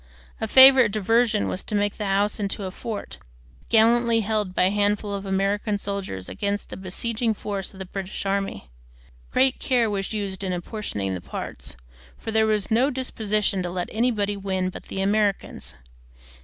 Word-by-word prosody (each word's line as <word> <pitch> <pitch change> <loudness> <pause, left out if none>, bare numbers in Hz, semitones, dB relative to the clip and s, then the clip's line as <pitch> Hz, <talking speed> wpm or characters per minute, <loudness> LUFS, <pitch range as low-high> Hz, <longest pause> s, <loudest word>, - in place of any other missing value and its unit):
A 220 - 0
favorite 260 -2 +8
diversion 220 +1 +2
was 185 - -3
to 210 - -4
make 205 0 0
the 210 - -3
house 200 +2 +1
into 200 0 -2
a 190 - -4
fort, 215 +2 -6 0.5
gallantly 230 0 +4
held 210 -3 -1
by - - +3
a 185 - +4
handful 205 0 0
of 200 0 -4
American 200 +2 0
soldiers 195 - -4
against 205 0 -3
a - - -4
besieging 220 +4 -1
force 200 -2 -4
of - - -15
the 190 - -6
British 195 +1 -6
army. 195 - -2 0.6
Great 260 +1 +2
care 240 -4 +2
was 195 -1 -2
used 200 -3 -3
in 185 -1 -1
apportioning 175 - -3
the 90 - -4
parts, - - -7 0.4
for - - -6
there 220 0 +3
was 215 -2 0
no 245 +5 +4
disposition 215 -7 -1
to 180 - -3
let 180 0 -3
anybody 215 -3 0
win 190 -2 -2
but - - -10
the 195 - -4
Americans. 200 - 0
205 Hz, 170 wpm, -24 LUFS, 195-220 Hz, 0.6 s, favorite